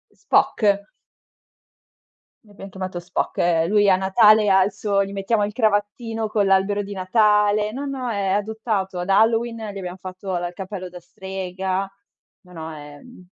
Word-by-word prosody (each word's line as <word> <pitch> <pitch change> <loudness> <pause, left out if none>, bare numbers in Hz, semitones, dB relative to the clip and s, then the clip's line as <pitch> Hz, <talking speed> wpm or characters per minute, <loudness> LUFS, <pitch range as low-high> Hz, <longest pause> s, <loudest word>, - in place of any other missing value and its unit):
Spock. 200 -1 +1 1.6
L'abbiam 205 -2 -12
chiamato 185 -1 -5
Spock. 175 +1 -3
Eh, 165 -1 +2
lui 205 +1 +3
a 190 - +6
Natale 210 +3 +4
ha 190 -1 +5
il 200 - -1
suo 200 0 0
gli 195 - -7
mettiamo 205 +2 0
il 210 - -6
cravattino 220 0 -1
con 210 -1 +1
l'albero 195 +1 +2
di 200 +1 -7
Natale, 210 +2 +2
no, 270 +5 -5
no, 265 -3 -4
è 200 -3 -2
adottato. 205 -2 -2
Ad 175 +2 -4
Halloween, 225 +3 +2 0.2
gli - - -8
abbiam 180 -1 -6
fatto 185 0 -5
la 175 0 -2
il 175 - -9
cappello 190 0 -6
da 180 0 -10
strega. 190 +1 -4 0.5
No, 180 -2 -18
no, 160 -1 -7
è, 145 -1 -11
mhmm 245 -7 -16
195 Hz, 165 wpm, -22 LUFS, 185-210 Hz, 1.6 s, a